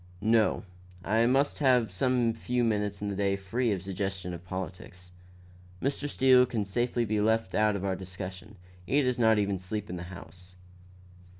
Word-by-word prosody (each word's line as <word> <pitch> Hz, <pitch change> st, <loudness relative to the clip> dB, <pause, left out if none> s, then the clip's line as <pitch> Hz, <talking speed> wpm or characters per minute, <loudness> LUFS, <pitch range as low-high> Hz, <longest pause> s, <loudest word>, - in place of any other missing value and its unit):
"No; 110 Hz, 0 st, +3 dB, 0.4 s
I 110 Hz, +3 st, +3 dB
must 135 Hz, +3 st, +2 dB
have 125 Hz, -7 st, +3 dB
some 120 Hz, +3 st, +1 dB
few 120 Hz, +2 st, -1 dB
minutes 105 Hz, -3 st, -1 dB
in 105 Hz, -, -1 dB
the 100 Hz, -, -3 dB
day 100 Hz, 0 st, +1 dB
free 115 Hz, +6 st, -1 dB
from 100 Hz, -, +1 dB
the 90 Hz, -, -10 dB
suggestion 95 Hz, -1 st, -4 dB
of 85 Hz, 0 st, -8 dB
politics. 90 Hz, 0 st, -7 dB, 0.7 s
Mr. 140 Hz, +4 st, -2 dB
Steele 130 Hz, -2 st, +5 dB
can 110 Hz, -4 st, -2 dB
safely 120 Hz, +4 st, 0 dB
be 105 Hz, -1 st, 0 dB
left 110 Hz, +1 st, +1 dB
out 105 Hz, -1 st, +3 dB
of 100 Hz, -1 st, -3 dB
our 95 Hz, -1 st, 0 dB
discussion. 95 Hz, +2 st, -8 dB, 0.3 s
He 135 Hz, +10 st, +1 dB
does 125 Hz, -1 st, 0 dB
not 110 Hz, -2 st, +5 dB
even 100 Hz, -2 st, 0 dB
sleep 100 Hz, +2 st, -5 dB
in 90 Hz, -, -4 dB
the -, -, -6 dB
house." 90 Hz, 0 st, -12 dB
105 Hz, 180 wpm, -29 LUFS, 95-120 Hz, 0.7 s, Steele